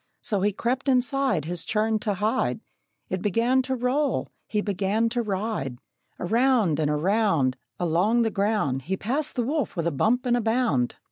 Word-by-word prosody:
So 205 -5 -1
he 205 +2 +2
crept 255 +7 -1
inside 255 - +1
His 175 0 -4
churn 215 0 0
to 205 -1 -1
hide; 215 +7 0 0.5
It 185 - -2
began 230 +6 +2
to 260 0 -2
roll; 260 +3 0 0.2
he 210 - -1
began 205 +3 0
to 240 +1 -1
ride; 200 - -3 0.4
Around 225 - +2
and 150 -2 +1
around, 160 - +2 0.2
Along 180 +8 +2
the 225 - 0
ground, 200 -11 0
He 190 +8 -3
passed 275 +10 -2
the 245 - 0
wolf 280 +1 -1
with 170 -2 -2
a 170 - +1
bump 230 - +1
and 240 -1 +2
bound. 220 - +1
215 Hz, 165 wpm, -25 LUFS, 180-245 Hz, 0.5 s, he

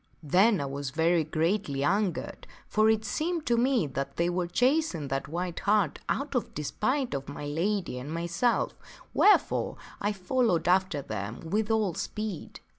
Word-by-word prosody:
Then 190 +7 +4
I 140 - -2
was 140 0 -4
very 165 +4 +2
greatly 155 -2 0
angered, 190 +1 -1 0.2
for 215 +1 +3
it 220 0 +2
seemed 320 - -2
to 240 - +2
me 245 - +2
that 140 0 -4
they 170 +1 +1
were 175 0 -1
chasing 245 - +1
that 135 0 -2
white 175 +2 -3
hart 200 -7 +2
out 280 +1 -1
of 245 - -2
despite 250 - -1
of 140 0 -4
my 145 +1 -6
lady 170 -1 -1
and 140 +4 -7
myself, 170 +8 0 0.4
wherefore 420 - +3 0.2
I 205 - +1
followed 205 -1 +1
after 185 -5 +2
them 110 0 -5
with 215 +1 +1
all 215 -5 +1
speed. 210 0 -5
180 Hz, 160 wpm, -28 LUFS, 150-220 Hz, 0.4 s, Then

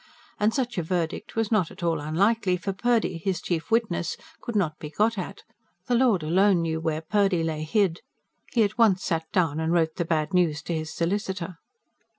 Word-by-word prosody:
And 210 +1 +3
such 245 -5 -1
a - - +1
verdict 170 0 -3
was 225 -1 0
not 190 -7 +2
at 185 - -11
all 165 -2 +1
unlikely; 185 +5 +1
for 195 +2 -3
Purdy, 225 -4 +1
his 180 0 -1
chief 165 -3 -3
witness, 225 -7 0 0.2
could 235 -3 -5
not 160 -7 0
be 150 - -6
got 215 +8 +1
at: 195 +1 -6 0.4
the 245 - -1
Lord 235 -8 +3
alone 180 +2 +3
knew 160 -1 -1
where 160 -1 -1
Purdy 195 0 +1
lay 160 -1 -2
hid. 170 +2 +1 0.5
He 230 - +3
at 215 +4 -2
once 200 -5 +4
sat 160 -1 -2
down 160 -5 +1
and 160 0 0
wrote 160 -2 +1
the 170 - +1
bad 160 +1 0
news 170 -5 +2
to 170 - -3
his 155 -1 -3
solicitor. 185 -1 -2
180 Hz, 195 wpm, -26 LUFS, 160-205 Hz, 0.5 s, once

